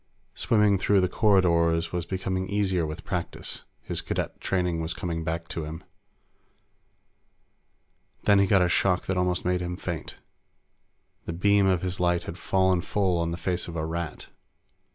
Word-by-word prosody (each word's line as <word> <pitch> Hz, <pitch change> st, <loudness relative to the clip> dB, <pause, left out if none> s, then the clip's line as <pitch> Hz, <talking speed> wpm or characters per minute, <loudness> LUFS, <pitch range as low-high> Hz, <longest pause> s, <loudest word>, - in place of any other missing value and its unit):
Swimming 105 Hz, -4 st, +3 dB
through 100 Hz, +1 st, +3 dB
the 90 Hz, -, +3 dB
corridors 85 Hz, -5 st, +3 dB
was 90 Hz, -1 st, -2 dB
becoming 95 Hz, 0 st, -2 dB
easier 95 Hz, -5 st, +1 dB
with 75 Hz, +3 st, -6 dB
practice; 90 Hz, -3 st, -4 dB, 0.2 s
his -, -, -3 dB
Cadet -, -, -3 dB
training 90 Hz, -3 st, 0 dB
was 80 Hz, +1 st, -3 dB
coming 85 Hz, -3 st, -3 dB
back 80 Hz, 0 st, -3 dB
to 80 Hz, -, -3 dB
him. 80 Hz, +3 st, -7 dB, 2.4 s
Then 100 Hz, -1 st, +5 dB
he 100 Hz, -, +4 dB
got 95 Hz, -1 st, +5 dB
a -, -, +3 dB
shock 90 Hz, +1 st, +2 dB
that 95 Hz, -, -1 dB
almost 90 Hz, -1 st, 0 dB
made 90 Hz, 0 st, +1 dB
him 90 Hz, 0 st, -3 dB
faint. 85 Hz, -5 st, -5 dB, 1.1 s
The 85 Hz, -, -4 dB
beam 100 Hz, +3 st, +3 dB
of 90 Hz, -2 st, +2 dB
his 90 Hz, -1 st, -3 dB
light 90 Hz, -1 st, +2 dB
had 85 Hz, -, -7 dB
fallen 95 Hz, -1 st, +2 dB
full 95 Hz, -2 st, 0 dB
on 85 Hz, 0 st, 0 dB
the 85 Hz, -, -3 dB
face 90 Hz, +1 st, -2 dB
of 85 Hz, -, -7 dB
a 80 Hz, -1 st, -2 dB
Rat. 85 Hz, -1 st, -5 dB
90 Hz, 165 wpm, -27 LUFS, 85-95 Hz, 2.4 s, Then